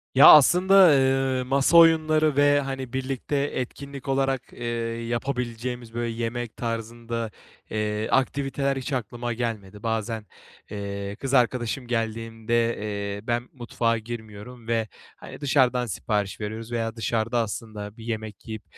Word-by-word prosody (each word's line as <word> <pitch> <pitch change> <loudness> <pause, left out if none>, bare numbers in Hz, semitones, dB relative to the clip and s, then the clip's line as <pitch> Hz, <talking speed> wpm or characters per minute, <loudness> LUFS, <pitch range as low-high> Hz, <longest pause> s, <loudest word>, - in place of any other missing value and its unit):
Ya, 140 +3 +9
aslında, 180 +6 +7 0.2
ııı, 135 -2 +2
masa 135 +5 +3
oyunları 155 -2 +5
ve, 145 0 +5
hani, 135 -2 -5
birlikte 130 +2 -3
etkinlik 140 0 -4
olarak, 135 -1 0
ııı, - - -13 0.4
yapabileceğimiz, 120 -1 -3
böyle, 120 0 -2
yemek 115 0 -4
tarzında, 115 0 -4 0.4
ııı, 105 0 -1
aktiviteler 135 0 0
hiç 135 +2 -4
aklıma 120 0 -3
gelmedi. 105 -4 -4
Bazen, 110 -1 -2 0.5
ııı, 100 -1 -5
kız 135 +3 -4
arkadaşım 125 0 +1
geldiğinde, 115 0 -1
eee, 100 0 -4
ben 120 +1 -1
mutfağa 115 -2 -1
girmiyorum 110 +1 -9
ve, 115 -1 0 0.3
hani, - - -11
dışarıdan 130 -3 +3
sipariş 105 -2 -2
veriyoruz 110 +2 -5
veya 115 -1 -2
dışarıda 115 +1 0
aslında 105 -1 -5
bir 115 - -10
yemek 110 -1 -5
yiyip, 110 -1 -6
120 Hz, 130 wpm, -25 LUFS, 110-135 Hz, 0.5 s, Ya